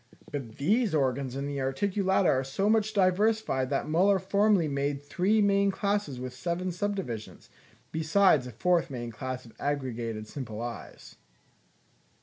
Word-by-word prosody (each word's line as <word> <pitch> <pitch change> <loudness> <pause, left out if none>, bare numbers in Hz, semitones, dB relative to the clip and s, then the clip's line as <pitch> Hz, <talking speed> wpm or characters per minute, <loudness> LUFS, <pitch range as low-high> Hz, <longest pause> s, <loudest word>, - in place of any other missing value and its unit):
But 130 -7 -6
these 205 - +2
organs 135 -2 0
in 140 +1 -3
the 140 -1 -3
Articulata 190 +7 +1
are 130 0 +3
so 135 +10 -1
much 215 0 +2
diversified 195 -7 +2
that 140 - 0
Müller 185 +6 +3
formerly 200 -2 +2
made 140 0 -2
three 190 +8 +2
main 200 0 +3
classes 200 -9 -1
with 125 0 -5
seven 175 +6 -2
subdivisions, 180 - -4 0.4
besides 160 -3 +3
a - - -7
fourth 175 +8 +1
main 120 -3 -5
class 130 +2 -5
of 115 - -15
aggregated 120 -6 -3
simple 115 -4 -6
eyes. 120 0 -8
155 Hz, 140 wpm, -28 LUFS, 130-200 Hz, 0.4 s, are